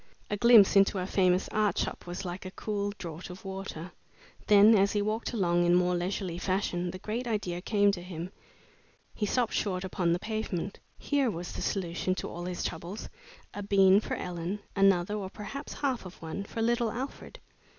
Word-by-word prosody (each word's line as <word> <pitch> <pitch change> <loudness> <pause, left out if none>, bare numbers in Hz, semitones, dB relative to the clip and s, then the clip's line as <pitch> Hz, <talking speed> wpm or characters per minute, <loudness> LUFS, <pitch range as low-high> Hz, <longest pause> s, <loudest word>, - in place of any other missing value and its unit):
A - - +2
glimpse 225 -3 +7
into 195 0 +5
a 180 - -1
famous 185 -1 +2
art 210 -4 +1
shop - - -3
was 175 +2 -5
like 180 +1 -5
a 185 - -6
cool 205 +1 -3
draught 170 0 -7
of 180 +2 -10
water. 190 -3 -6 0.6
Then, 210 +2 +7
as 200 0 +3
he 210 - +1
walked 215 +2 -2
along 175 -6 +2
in 175 0 +4
more 180 0 +3
leisurely 175 0 -2
fashion, 180 -2 -1
the 185 - -6
great 225 +6 -4
idea 190 -6 -2
came 205 0 +3
to 185 -3 -5
him. 175 0 -6 0.8
He 210 - -2
stopped 240 +1 +1
short 185 -3 -1
upon 180 -2 0
the 170 - +3
pavement. 205 -2 -4 0.2
Here 280 -3 +1
was 175 -3 -5
the - - -6
solution 185 -1 -1
to - - -4
all 175 +1 -6
his 180 -1 -3
troubles: 185 +5 -5 0.4
a 205 - -5
bean 195 -1 +5
for - - -3
Ellen; 180 +3 -4
another, 195 -1 +3
or 200 -3 -3
perhaps 215 +9 -7
half 265 -4 -1
of 185 -1 -11
one, 165 +5 -5
for 225 +2 -3
little 235 0 +2
Alfred! 260 +5 -6
195 Hz, 190 wpm, -29 LUFS, 180-210 Hz, 0.8 s, glimpse